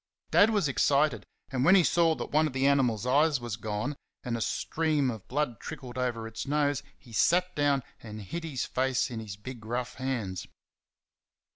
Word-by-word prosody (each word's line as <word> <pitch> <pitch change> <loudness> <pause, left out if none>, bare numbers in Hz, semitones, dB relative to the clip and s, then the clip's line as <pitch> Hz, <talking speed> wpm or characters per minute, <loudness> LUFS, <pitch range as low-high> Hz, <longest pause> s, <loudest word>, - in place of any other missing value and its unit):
Dad 210 - +6
was 205 -8 +2
excited, 140 +2 +2 0.2
and 130 -1 0
when 175 +6 +7
he 185 - +6
saw 165 -1 +3
that - - -6
one 155 +1 +3
of 145 - -6
the 130 +1 +1
animal's 125 -6 +2
eyes 145 +3 +3
was 120 -3 -4
gone 110 +6 -3 0.3
and 120 -2 -2
a 115 - -3
stream 150 0 0
of 110 -4 -9
blood 130 -4 -1
trickled 125 -2 -8
over 125 -3 -2
its 115 +4 -6
nose 145 -1 +1 0.2
he 120 - -16
sat 180 +9 +2
down 145 -3 +2 0.2
and 105 -2 -8
hid 170 - -5
his 145 -7 -3
face 130 -1 0
in 115 - -4
his 105 -3 -7
big 120 +2 -9
rough 120 +3 -3
hands. 115 -9 -3
130 Hz, 185 wpm, -29 LUFS, 115-150 Hz, 0.3 s, when